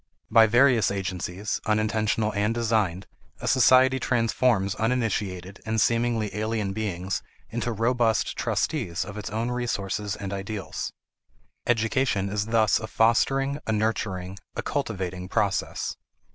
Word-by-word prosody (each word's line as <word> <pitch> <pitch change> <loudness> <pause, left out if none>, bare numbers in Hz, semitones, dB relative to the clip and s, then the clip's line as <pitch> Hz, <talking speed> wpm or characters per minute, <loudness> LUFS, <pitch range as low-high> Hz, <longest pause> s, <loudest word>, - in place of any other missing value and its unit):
By 110 0 +7
various 120 -2 +4
agencies, 95 +1 -3
unintentional 110 0 +1
and 105 +3 0
designed, 110 -6 0 0.3
a - - -5
society 130 +1 +5
transforms 115 -5 +1
uninitiated 105 -5 -2
and 110 0 -1
seemingly 115 -2 +1
alien 105 -2 -1
beings 95 -3 -2 0.3
into 120 +1 -2
robust 115 0 +1
trustees 105 - -1
of 100 - -8
its 105 -2 -5
own 115 +3 -2
resources 105 -4 -2
and 100 -1 -5
ideals. 100 +1 -4 0.8
Education 115 -3 +1
is 105 +1 -1
thus 110 -3 +3
a 110 - -5
fostering, 135 +6 +2
a - - +1
nurturing, 100 -4 -1 0.2
a - - -3
cultivating, 95 -9 -3
process. 100 -1 -1
110 Hz, 120 wpm, -26 LUFS, 100-115 Hz, 0.8 s, By